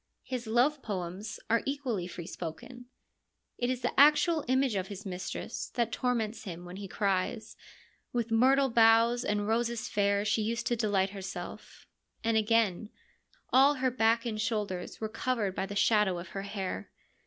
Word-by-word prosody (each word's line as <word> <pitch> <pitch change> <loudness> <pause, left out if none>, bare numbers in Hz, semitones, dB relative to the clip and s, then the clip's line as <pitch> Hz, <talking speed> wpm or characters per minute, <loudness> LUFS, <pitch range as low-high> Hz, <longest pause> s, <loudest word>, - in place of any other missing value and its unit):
His 250 -3 -5
love 255 +6 +2
poems 195 0 -5
are 230 0 +3
equally 260 -10 -2
free 170 -1 -8
spoken. 180 +10 -8 0.7
It 245 - 0
is 255 -1 -2
the - - -1
actual 300 +2 +5
image 260 -1 +2
of 190 -2 -2
his 200 +1 -8
mistress 185 -1 -5
that 235 -2 0
torments 235 -3 -1
him 175 -2 -7
when 180 +1 -8
he 200 0 -6
cries, 200 +3 -1 0.3
* - - -34
With 235 -2 -2
myrtle 265 +4 +4
boughs 230 +1 +5
and 205 -2 -1
roses 235 0 0
fair 200 0 +1
she 215 +1 +1
used 230 +2 -2
to 240 - +1
delight 200 -4 +1
herself 195 -1 -8 0.2
'; - - -44
and 225 0 +1
again, 215 -2 +2 0.3
' - - -37
All 275 +3 +6
her 260 -1 0
back 230 0 +2
and 215 -2 -2
shoulders 205 -5 -3
were 220 - -2
covered 215 -3 -1
by 190 - -2
the 200 - -6
shadow 210 -3 +3
of 175 0 -7
her 195 - -5
hair.' 200 -2 -5
220 Hz, 175 wpm, -30 LUFS, 195-240 Hz, 0.7 s, All